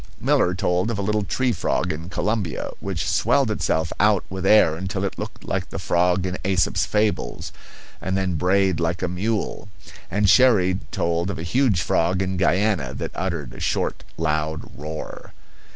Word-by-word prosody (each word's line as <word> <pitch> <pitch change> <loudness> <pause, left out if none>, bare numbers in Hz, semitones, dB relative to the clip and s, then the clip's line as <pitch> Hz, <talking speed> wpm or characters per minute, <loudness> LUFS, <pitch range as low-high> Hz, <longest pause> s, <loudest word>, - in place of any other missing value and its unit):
Miller 90 +1 +2
told 90 +3 0
of 115 - -2
a - - -2
little 105 +1 +1
tree 130 +6 0
frog 90 -2 0
in 80 +3 -7
Colombia 95 -2 -2
which 90 -4 -3
swelled 115 - +2
itself 80 -5 0
out 105 -1 +4
with 95 0 -2
air 100 -7 +6
until 95 +2 -3
it 95 - -4
looked - - -7
like - - -2
the - - -6
frog 90 +1 +1
in 90 0 -3
Aesop's 95 -1 +1
fables, 105 - -1 0.5
and 95 +1 -1
then 95 -1 0
brayed 90 +1 +2
like 85 +2 -1
a - - +1
mule; 105 +3 -2 0.4
and 105 +2 +1
Cherrie 95 -6 +5
told 85 +2 0
of 95 - -3
a 80 - -5
huge 100 - +2
frog 90 +3 +1
in 95 0 -2
Guiana 90 - +1
that - - -4
uttered - - -3
a - - -10
short, - - -1
loud 80 -1 -2
roar. 75 +1 -7
95 Hz, 170 wpm, -23 LUFS, 85-100 Hz, 0.5 s, air